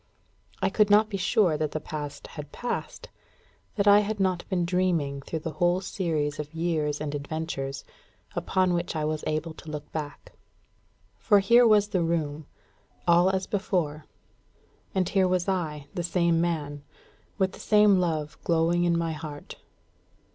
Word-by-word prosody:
I - - +2
could 210 -1 +3
not 210 +1 +5
be 195 - -1
sure 195 -4 +2
that 155 -1 -2
the 155 - -1
Past 150 -1 -6
had 150 -2 -9
passed, 245 - -5 0.7
that 200 -1 +1
I 205 0 +8
had 210 0 -2
not 185 -2 0
been 180 -3 0
dreaming 170 -6 0
through 160 +3 -5
the 165 - -4
whole 175 +4 +1
series 160 -6 -2
of 150 +1 -6
years 155 -3 -1
and 150 -1 -4
adventures, 140 -2 -4 0.5
upon 185 -1 +1
which 170 -1 -2
I 155 -1 -1
was 155 0 -2
able 155 +1 -2
to 160 - -11
look 150 -1 -7
back. 150 -2 -6 0.9
For 205 - +4
here 235 +5 +6
was 210 -1 +4
the 190 -4 0
room, 155 -3 -2 0.6
all 175 +2 +5
as 190 0 -1
before; 170 -7 -2 0.9
and 185 -2 +2
here 190 -2 +2
was 180 0 0
I, 160 -7 -2
the 175 - -2
same 170 -1 +1
man, 150 -4 -2 0.6
with 190 -2 +1
the - - -13
same 210 -2 +5
love 155 -4 -2
glowing 170 +1 +2
in 170 -1 +2
my 165 -1 -1
heart. 150 -2 -8
170 Hz, 160 wpm, -27 LUFS, 150-190 Hz, 0.9 s, I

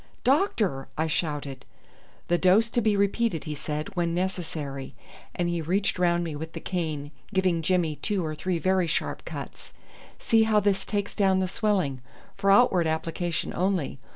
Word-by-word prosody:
"Doctor!" 235 - +1
I 160 - +1
shouted. 145 -4 -2 0.6
"The 175 0 +2
dose 210 +5 +4
to 240 - +1
be 215 -2 +2
repeated," 200 -2 +1
he 155 - -4
said, 150 +6 -5
"when 170 -1 0
necessary," 160 -7 -3 0.4
and 175 - 0
he 170 -1 -1
reached 190 +4 0
round 175 -1 +2
me 160 -3 -4
with 160 +2 -6
the - - -5
cane, 155 -5 -3 0.2
giving 185 -4 +2
Jimmy 165 -2 +1
two 200 -5 -1
or 155 - -3
three 175 +3 -2
very 185 +1 +2
sharp 160 - -2
cuts. - - -8 0.4
"See 225 -1 +3
how 220 -1 +4
this 195 -1 0
takes 205 -1 -2
down 195 -2 +3
the 190 0 +1
swelling. 180 - 0 0.3
For 195 0 0
outward 195 -5 +5
application 165 +1 -2
only. 180 -7 0
180 Hz, 165 wpm, -27 LUFS, 160-200 Hz, 0.6 s, outward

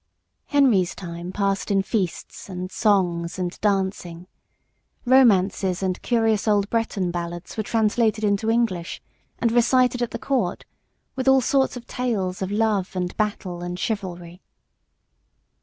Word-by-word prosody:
Henry's 240 - +3
time 175 0 -7
passed 195 +1 -1
in 195 -1 +2
feasts 195 -2 -3
and 185 0 -5
songs 180 -5 +1
and 180 -1 -4
dancing. 190 -4 -1 0.8
Romances 195 -7 +3
and 185 -1 -1
curious 225 -3 +1
old 205 -1 +2
Breton 215 -6 -1
ballads 175 0 -5
were 220 - -1
translated 220 0 +1
into 205 +1 +1
English, 225 -7 0 0.4
and 230 - +1
recited 250 +1 +3
at 240 - 0
the - - -5
Court 245 -10 -1 0.5
with 260 0 -3
all 265 0 +6
sorts 265 +1 +1
of 240 - -10
tales 200 -8 -2
of 190 - -2
love 205 -3 0
and 180 -1 -2
battle 190 -4 -2
and 175 0 -4
chivalry. 180 -4 -4
200 Hz, 135 wpm, -23 LUFS, 180-225 Hz, 0.8 s, all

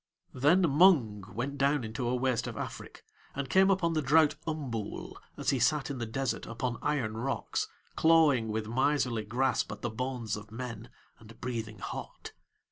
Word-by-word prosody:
Then 145 +9 +4
Mung 140 - +4
went 140 +5 -3
down 140 0 +2
into 115 +2 -3
a 125 - +1
waste 125 -2 0
of - - -5
Afrik, - - -7 0.3
and 135 -1 -4
came 190 +1 +5
upon 185 -4 +2
the 155 - +1
drought 150 +2 +4
Umbool 130 -9 -4 0.2
as - - +1
he 135 - 0
sat 150 +3 +2
in 135 - -5
the 115 - -3
desert 135 +4 -2
upon 115 +1 -3
iron 130 -8 -1
rocks, 135 +4 -2 0.3
clawing 155 -8 +4
with 110 0 -2
miserly 125 -2 +1
grasp 125 +5 0
at - - -8
the 120 - -1
bones 120 -2 -3
of 105 0 -9
men 115 -1 -6 0.3
and 115 0 -15
breathing 115 -3 -4
hot. - - -7
125 Hz, 170 wpm, -30 LUFS, 115-145 Hz, 0.3 s, came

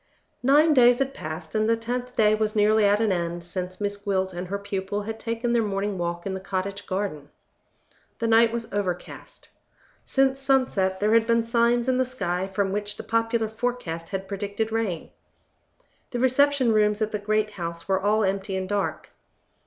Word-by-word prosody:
Nine 295 +5 +5
days 245 -2 +6
had 270 +1 -1
passed, 155 -6 -7
and 215 0 +1
the 230 - +3
tenth 245 +2 -4
day 215 -1 +4
was 215 0 0
nearly 215 0 +4
at 205 +1 +4
an 220 -2 +2
end, 170 -1 -2
since 180 +1 -5
Miss 205 -1 -2
Gwilt 190 -2 -1
and 175 +1 -5
her 200 +2 -2
pupil 200 0 -3
had 220 +1 -5
taken 230 +1 -2
their 235 - +3
morning 200 -2 -2
walk 170 0 -3
in 195 - -2
the 190 - -4
cottage 195 +1 -4
garden. 185 -7 -3 0.9
The 230 - -2
night 225 0 +5
was 230 -2 -5
overcast. 185 -4 -5 0.6
Since 270 0 +2
sunset, 255 -9 +1
there 210 +2 +3
had 230 0 +4
been 230 0 +3
signs 235 +1 +2
in 255 0 +2
the - - +4
sky 190 -7 -2
from 195 0 -1
which 205 +1 -3
the - - -6
popular 230 0 0
forecast 220 -8 -4
had 195 -1 -4
predicted 205 +2 -3
rain. 220 -7 -2 1.0
The 245 - -4
reception 260 0 +3
rooms 210 0 +3
at 215 - -2
the 210 - -2
great 215 +1 0
house 170 -3 -6
were 190 -1 +1
all 210 +2 +2
empty 195 0 -1
and 185 0 -3
dark. 205 0 -2
210 Hz, 185 wpm, -25 LUFS, 190-230 Hz, 1.0 s, days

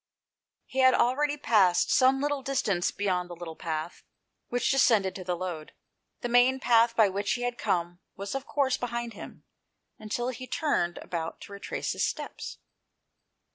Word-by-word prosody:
He 265 - -4
had 260 0 +6
already 290 +5 +2
passed 200 -10 +3
some 265 +1 +4
little 290 -1 -1
distance 215 -10 0
beyond 180 -3 -1
the 175 - -7
little 165 -1 -8
path 160 0 -4 0.5
which 245 -1 +1
descended 225 -8 +3
to 185 - -7
the 180 -1 -2
Lode. 170 -4 -5 0.5
The - - -2
main 245 +2 +4
path 235 -1 +4
by 220 -2 +5
which 200 +1 -1
he 245 - -3
had 245 0 -1
come 175 0 -1 0.2
was 200 +1 -5
of 270 0 -4
course 270 -3 +1
behind 235 -1 -4
him, - - -11 0.6
until 240 +3 -3
he 255 0 -7
turned 175 - 0
about 165 -2 -4
to - - -11
retrace 200 - -4
his - - -1
steps. - - -4
230 Hz, 165 wpm, -28 LUFS, 180-255 Hz, 0.6 s, had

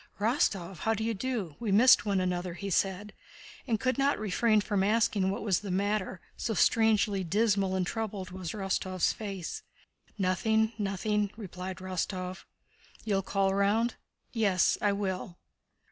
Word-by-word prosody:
"Rostóv! 200 - 0
How 225 +7 0
d'you 220 +1 -1
do? 215 - -3
We 225 -4 -2
missed 230 +2 +6
one 200 -2 +2
another," 180 -1 -2
he 200 +2 -5
said, 195 +3 0 0.5
and 225 -4 +1
could 260 +1 0
not 280 +1 +2
refrain 215 +2 +2
from 205 -2 0
asking 205 -2 +2
what 195 - -3
was 195 -5 +2
the 205 - -7
matter, 195 0 -1 0.2
so 220 - -2
strangely 215 -3 +3
dismal 195 +1 +1
and 185 -1 0
troubled 200 -3 -4
was 185 -3 -5
Rostóv's 190 -2 0
face. 195 -5 -5 0.6
"Nothing, 220 +4 +1
nothing," 205 +1 0
replied 185 -3 -6
Rostóv. 185 0 -4 0.6
"You'll 200 -3 +1
call 195 0 0
round?" 210 +4 +2 0.4
"Yes, 200 -6 +3
I 205 - +3
will." 190 -3 -3
200 Hz, 145 wpm, -29 LUFS, 185-220 Hz, 0.6 s, missed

